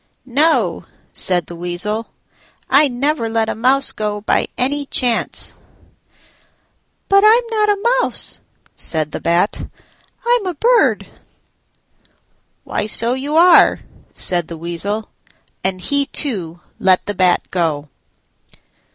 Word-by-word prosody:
"No," 290 +6 +1 0.3
said 180 -2 0
the 170 - -10
Weasel, 180 +6 -3 0.6
"I 285 +3 +5
never 265 -1 -1
let 225 0 -1
a - - -1
mouse 265 +5 +2
go 210 -1 -4
by 215 - 0
any 285 +2 -1
chance." 245 -4 +1 1.5
"But 395 0 +4
I'm 450 +3 +5
not 425 -1 +1
a 470 +5 +1
mouse," - - -2 0.4
said 155 -2 -2
the - - -5
Bat; 170 +5 0 0.6
"I'm 480 -3 +2
a 360 - -3
bird." 475 - +2 1.6
"Why, 210 - -3
so 230 +2 +4
you 280 +4 -3
are," 345 +1 +6 0.3
said 175 -3 0
the 165 - -8
Weasel; 185 +6 -4 0.5
and 190 0 -1
he 280 +8 -1
too 175 - -2 0.2
let 185 -1 +2
the 205 - -3
Bat 185 -2 +1
go. 160 -5 -1
225 Hz, 120 wpm, -17 LUFS, 180-295 Hz, 1.6 s, are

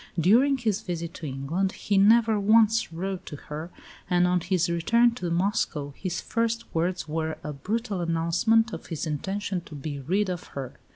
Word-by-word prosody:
During 245 - +4
his 220 -4 -1
visit 170 -4 -4
to 155 - -6
England 145 +9 -2
he 205 - -2
never 220 +1 +5
once 220 0 +4
wrote 185 +3 -4
to 150 - -6
her, 150 +3 -7 0.4
and 180 -1 +4
on 180 0 +2
his 180 -1 0
return 230 +8 +3
to 180 -7 -4
Moscow 170 -5 -1
his 185 -3 -3
first 230 0 -1
words 175 +1 -1
were 160 0 -2
a 150 - -4
brutal 205 - -3
announcement 175 +8 +2
of - - -7
his 165 -2 -4
intention 190 +5 -2
to 165 -3 -11
be 145 0 -5
rid 190 +9 0
of 180 -2 -4
her. 135 -2 -5
180 Hz, 175 wpm, -26 LUFS, 165-215 Hz, 0.4 s, never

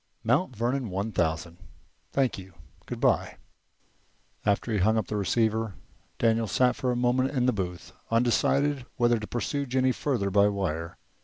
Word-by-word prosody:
"Mount 125 +4 +1
Vernon 120 +2 -1
one 100 +4 -2
thousand." 85 -1 -1 0.5
"Thank 130 -6 +1
you. 95 -2 -12 0.3
Goodby." - - +1 1.1
After 105 +3 0
he 105 - +1
had - - +2
hung 110 +2 +3
up 110 - 0
the 105 - -4
receiver, 110 +1 0 0.4
Daniel 115 -1 +2
sat 125 +4 +2
for 125 - -1
a - - 0
moment 125 +2 +2
in 130 -3 0
the 125 - +3
booth, 90 -3 -5 0.2
undecided 125 +4 +2
whether 120 -2 +3
to 105 - -6
pursue 140 +3 -2
Jennie 130 +1 +2
further 120 -8 -1
by 100 +1 +5
wire. 85 -5 -3
115 Hz, 160 wpm, -27 LUFS, 100-125 Hz, 1.1 s, by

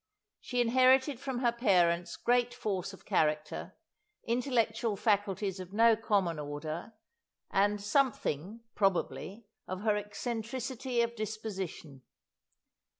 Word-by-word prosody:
She 245 -1 -1
inherited 260 +2 +4
from 260 -2 -3
her 240 -2 +3
parents 175 -7 +2
great 245 0 +2
force 200 -7 -2
of 195 - -14
character, 155 -5 0 0.5
intellectual 235 -2 0
faculties 200 -2 0
of 185 +1 -8
no 225 +1 +6
common 200 -7 0
order, 155 +7 -5 0.6
and 205 +1 +2
something, 210 - 0
probably, 195 +2 -1 0.2
of 185 +1 -4
her 210 -1 +2
eccentricity 235 +4 -3
of 235 0 -3
disposition. 200 - -5
215 Hz, 105 wpm, -31 LUFS, 185-235 Hz, 0.6 s, no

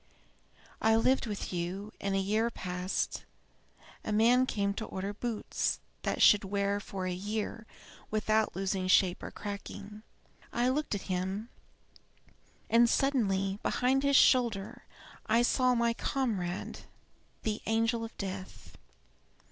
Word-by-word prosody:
"I 220 0 +4
lived 255 +2 +2
with 205 -3 -4
you, 180 +4 -4
and 195 0 -1
a - - +2
year 215 +4 +1
passed. 180 -3 -3 0.8
A - - -3
man 240 +4 +4
came 200 -3 0
to 220 - -4
order 195 +1 -4
boots 225 0 -2 0.2
that - - 0
should 210 0 +7
wear 200 +1 0
for 195 -2 -5
a 185 - -1
year 210 +4 -4 0.4
without 215 -1 +1
losing 190 0 -1
shape 185 -1 +4
or - - -6
cracking. 205 +1 -7 0.5
I 245 +1 +1
looked 285 -3 -1
at 200 - -4
him, 190 +4 -3 1.2
and 235 +1 +5
suddenly, 200 -9 +1
behind 260 +2 +1
his 280 0 +2
shoulder, 235 -8 +3 0.4
I 230 +2 +4
saw 250 0 +3
my 235 0 +2
comrade 205 -9 -2 0.6
the 215 -1 -2
angel 225 +1 +1
of 225 - -8
death. 190 -1 -7
210 Hz, 130 wpm, -31 LUFS, 195-235 Hz, 1.2 s, should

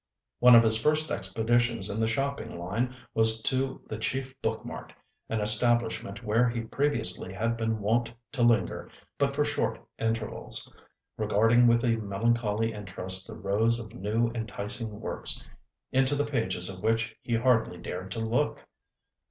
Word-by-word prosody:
One 125 0 +8
of 115 - +8
his 110 0 +9
first 155 +3 +1
expeditions 115 +2 0
in 105 +1 -3
the 110 - +1
shopping 135 -1 -3
line 110 +9 -3 0.2
was 110 0 +8
to 130 0 -1
the 110 - -6
chief 130 +3 -3
book - - -3
mart, - - -8 0.4
an 110 -1 -1
establishment 110 -1 +1
where 115 +3 +2
he 115 0 -3
previously 115 -5 -2
had 115 +4 -2
been 115 -1 -2
wont 115 +3 0 0.2
to 135 - -3
linger 115 -6 +1 0.3
but 140 -1 0
for 150 0 +1
short 145 - -1 0.2
intervals, 115 -1 -1 0.4
regarding 115 +3 +3
with 115 0 +3
a 115 -2 +1
melancholy 110 +1 -1
interest 95 -2 -2
the - - -9
rows 110 +4 +1
of 110 -1 -9
new, 115 +2 -1
enticing 110 -1 -5
works, 110 - -3 0.5
into 130 +2 +2
the 145 +1 0
pages 115 -10 +2
of 95 -1 -6
which 115 +2 0
he 120 - -2
hardly 115 -6 +1
dared 90 +2 -7
to - - -5
look. 115 +6 -1
115 Hz, 155 wpm, -27 LUFS, 105-120 Hz, 0.5 s, his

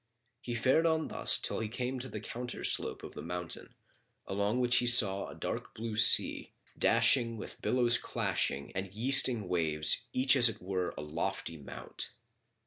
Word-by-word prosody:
He 120 -3 -5
fared 130 +8 +2
on 160 -1 -1
thus - - +3
till - - -3
he 110 - -3
came 125 +3 -4
to 130 +1 -7
the 105 - -6
counterslope 120 +3 -2
of - - -9
the - - -8
mountain, 90 0 -7 0.5
along 100 +5 -1
which 125 0 +2
he 120 - +1
saw 100 -5 +3
a - - -10
dark - - -6
blue 110 0 -5
sea, 110 - +5 0.2
dashing 115 -3 +2
with - - -10
billows 125 -1 +2
clashing 70 - -2
and 95 0 -5
yeasting 120 -1 +3
waves 80 -4 +1
each 130 +1 +3
as 125 -3 +6
it 110 - -8
were 90 -1 -4
a - - -5
lofty 85 +3 -4
mount. 70 -3 -8
115 Hz, 165 wpm, -31 LUFS, 95-125 Hz, 0.5 s, as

